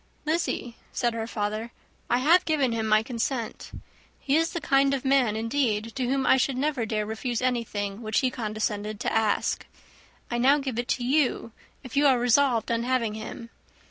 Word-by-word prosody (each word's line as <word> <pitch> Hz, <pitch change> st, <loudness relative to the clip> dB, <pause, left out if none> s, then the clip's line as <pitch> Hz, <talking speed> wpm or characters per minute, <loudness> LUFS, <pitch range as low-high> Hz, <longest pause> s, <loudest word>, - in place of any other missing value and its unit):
"Lizzy," 310 Hz, -7 st, -2 dB
said 240 Hz, -1 st, 0 dB
her 225 Hz, -1 st, -3 dB
father, 215 Hz, +1 st, -3 dB, 0.4 s
"I 245 Hz, -, +3 dB
have 330 Hz, +8 st, +5 dB
given 290 Hz, -6 st, +1 dB
him 225 Hz, -1 st, -1 dB
my 215 Hz, 0 st, +4 dB
consent. 235 Hz, 0 st, -3 dB, 0.5 s
He 275 Hz, -, 0 dB
is 330 Hz, +1 st, +1 dB
the 340 Hz, -, -2 dB
kind 275 Hz, -2 st, +3 dB
of 270 Hz, -, -6 dB
man, 265 Hz, -5 st, +3 dB
indeed, 225 Hz, -2 st, -1 dB
to 255 Hz, -2 st, -1 dB
whom 270 Hz, +1 st, 0 dB
I 265 Hz, -, +5 dB
should 265 Hz, 0 st, 0 dB
never 270 Hz, -4 st, -1 dB
dare 215 Hz, -1 st, -1 dB
refuse 220 Hz, +2 st, -3 dB
anything, 225 Hz, -5 st, -2 dB
which 220 Hz, +2 st, 0 dB
he 260 Hz, -2 st, +1 dB
condescended 215 Hz, -2 st, -3 dB
to -, -, -1 dB
ask. 220 Hz, -2 st, +1 dB, 0.7 s
I 240 Hz, -, 0 dB
now 270 Hz, +4 st, +5 dB
give 265 Hz, -5 st, -3 dB
it 240 Hz, -, -2 dB
to 250 Hz, -, -1 dB
you, 265 Hz, -3 st, +1 dB, 0.3 s
if 255 Hz, -, -9 dB
you 285 Hz, +1 st, +5 dB
are 265 Hz, -2 st, +5 dB
resolved 245 Hz, -1 st, +2 dB
on 230 Hz, 0 st, +1 dB
having 240 Hz, -3 st, 0 dB
him. 220 Hz, +2 st, -8 dB
240 Hz, 185 wpm, -26 LUFS, 220-270 Hz, 0.7 s, have